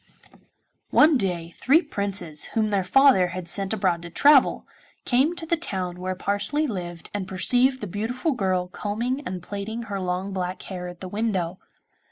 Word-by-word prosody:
One 305 0 +6
day 175 -7 -1
three 295 - +3
Princes, 200 - -2
whom 215 -1 +2
their 195 -2 +1
father 255 -2 +5
had 180 0 -6
sent 195 +2 -2
abroad 185 -6 +1
to 170 - -8
travel, 280 - +4 0.4
came 275 +7 +2
to 335 - -6
the 335 - +1
town 185 - -4
where 185 +1 -3
Parsley 205 +11 -1
lived 175 - -5
and 200 -2 -3
perceived 250 +7 +3
the - - -3
beautiful 225 - -2
girl 185 -7 0
combing 230 +8 -3
and 180 -2 -5
plaiting 210 +4 -5
her 200 -3 -4
long 185 +1 -2
black 185 -1 -3
hair 180 -2 -6
at 175 -1 -10
the 185 - -5
window. 190 -4 -2
200 Hz, 170 wpm, -24 LUFS, 180-245 Hz, 0.4 s, One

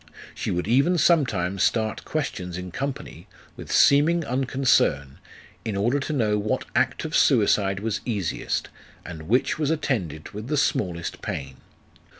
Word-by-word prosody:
She - - -4
would 90 +2 -2
even 140 +10 +3
sometimes 100 - +2
start 110 -2 0
questions 90 - -3
in 90 0 -6
company, 140 +7 -5 0.3
with - - -9 0.2
Homing 155 +4 +3
unconcern, 125 - +1 0.4
in 110 - -3
order 120 +8 +1
to 140 - -4
know 110 -7 +1
what 105 +1 -1
act - - +1
of - - -3
suicide 95 -1 +3
was 110 0 -2
easiest, 100 -9 -2 0.4
and 80 -3 -8
which 125 +5 +2
was 150 -2 0
attended 105 - -2
with 105 +3 -7
the 150 +2 -1
smallest 90 - -1
pain. 70 -2 -5
110 Hz, 145 wpm, -24 LUFS, 90-140 Hz, 0.4 s, even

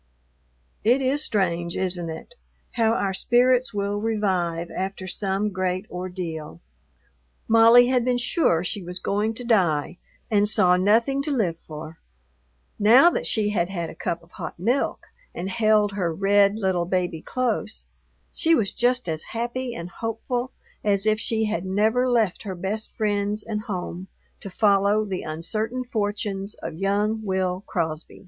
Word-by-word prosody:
It 240 +5 +4
is 270 +3 0
strange, 175 -4 -1
isn't 180 -2 -1
it? 160 - -8 0.4
how 225 -2 +2
our 195 -4 0
spirits 245 +3 +3
will 205 0 -2
revive 185 -6 -1
after 190 0 -4
some 195 +2 -1
great 185 0 -2
ordeal. 180 - -5 0.9
Molly 230 +2 +7
had 250 -2 +2
been 250 0 +1
sure 240 - +1
she 200 +2 -3
was 180 0 -6
going 210 +4 -1
to 245 - -7
die 180 -9 +1 0.3
and 205 -1 +3
saw 180 -4 +4
nothing 225 +9 +2
to 285 - -4
live 185 -11 0
for; 155 +1 -9 0.8
now 245 +11 +7
that - - -2
she 210 -2 +1
had 175 -4 0
had 170 -4 -4
a - - -13
cup 170 0 -2
of 170 - -22
hot - - -7
milk 235 +10 0 0.3
and 190 +2 -4
held 215 -1 +3
her 185 -4 -1
red 200 +3 +3
little 190 -5 0
baby 180 -3 -1
close, 225 - -2 0.5
she 330 0 +3
was 215 -8 0
just 250 -1 +1
as 160 -1 -1 0.2
happy 240 +1 -3
and 170 +1 -7
hopeful 240 +4 -3 0.3
as 200 -1 +2
if 215 0 +2
she 220 -1 0
had 210 -5 -2
never 220 +7 +1
left 225 -7 +1
her 195 -3 -5
best 195 +5 -3
friends 210 -1 0
and 210 -2 -3
home 185 -2 -5 0.3
to 195 - -7
follow 200 +2 +3
the 190 -3 -3
uncertain 215 +10 -3
fortunes 205 -3 -3
of - - -7
young 205 +5 0
Will 190 -1 -1
Crosby. 160 -4 -3
205 Hz, 155 wpm, -24 LUFS, 180-225 Hz, 0.9 s, Molly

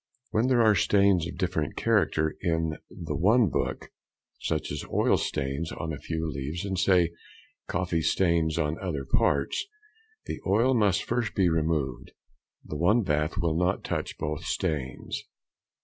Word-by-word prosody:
When 110 +3 +2
there 125 -3 +4
are 110 -1 +6
stains 100 -4 +3
of 85 - -8
different 85 -5 -1
character 80 0 +1
in 80 -3 0
the - - -5
one 105 +4 +4
book, - - -3 0.5
such 80 -1 -2
as - - -4
oil - - +3
stains 70 +3 -2
on 80 -1 -4
a 70 - -6
few 80 -1 -3
leaves, 75 +6 -4
and, 95 -2 -2
say, 90 -3 +4 0.6
coffee 85 -2 -1
stains 85 -2 +2
in 75 -1 -1
other 75 -8 -3
parts, 70 +1 +1 0.6
the - - -5
oil 115 +7 +3
must 105 -5 +3
be - - -8
first 120 -1 -2
removed; 80 -8 0 0.5
the 75 - -5
one 105 +9 +3
bath 75 -2 0
will 85 -2 +1
not 90 +2 +1
touch - - -3
both 75 0 -3
stains. 65 -4 -3
85 Hz, 150 wpm, -27 LUFS, 75-95 Hz, 0.6 s, are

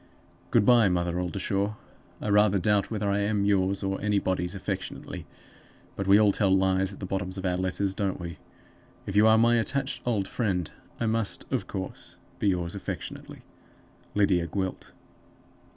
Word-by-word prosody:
"Good - - +3
by, 120 -4 +6
Mother 90 -1 0
Oldershaw. 100 +3 -1 0.5
I - - -2
rather 105 -1 +4
doubt 100 +2 +1
whether 105 -2 -2
I 100 0 +1
am 100 0 +1
yours, 100 -1 +2
or 95 0 -2
anybody's, 95 -3 0
affectionately; 95 - -5 0.7
but 100 - -3
we 100 +2 +7
all 105 -2 +5
tell 100 -1 +1
lies 95 0 +2
at 100 - -10
the 95 - -5
bottoms 95 0 -3
of 95 - -4
our 90 -1 +1
letters, 95 +1 -1
don't 95 -1 -2
we? 85 -2 -7 0.7
If 100 - -5
you 105 +2 +6
are 110 0 +6
my 120 +1 +4
attached 135 +4 -1
old 105 -6 0
friend, 90 -9 -1 0.3
I 115 - 0
must, 110 -1 +1
of - - -1
course, 95 -1 -6 0.2
be - - +1
yours 90 -3 0
affectionately. 100 - -7 0.7
"LYDIA 95 -4 +2
GWILT. 95 +2 -4
100 Hz, 165 wpm, -27 LUFS, 95-105 Hz, 0.7 s, we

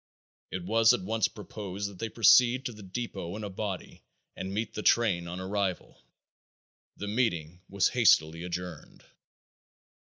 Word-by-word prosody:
It 95 - -5
was 115 +3 +5
at 120 - -2
once 110 +2 +1
proposed 100 -1 -6
that 100 -3 -11
they 115 - -3
proceed 120 +4 +5
to 120 - -3
the 105 - -12
depot 95 -3 -5
in 110 - -6
a 100 - -5
body 95 -1 -5 0.3
and 95 0 -5
meet 105 +2 -3
the 105 - -4
train 100 -7 +2
on 90 +2 -5
arrival. 95 -4 -3 1.0
The 105 - -5
meeting 90 -7 -1
was 100 0 +2
hastily 85 -9 +4
adjourned. 90 -2 -7
100 Hz, 150 wpm, -29 LUFS, 90-110 Hz, 1.0 s, was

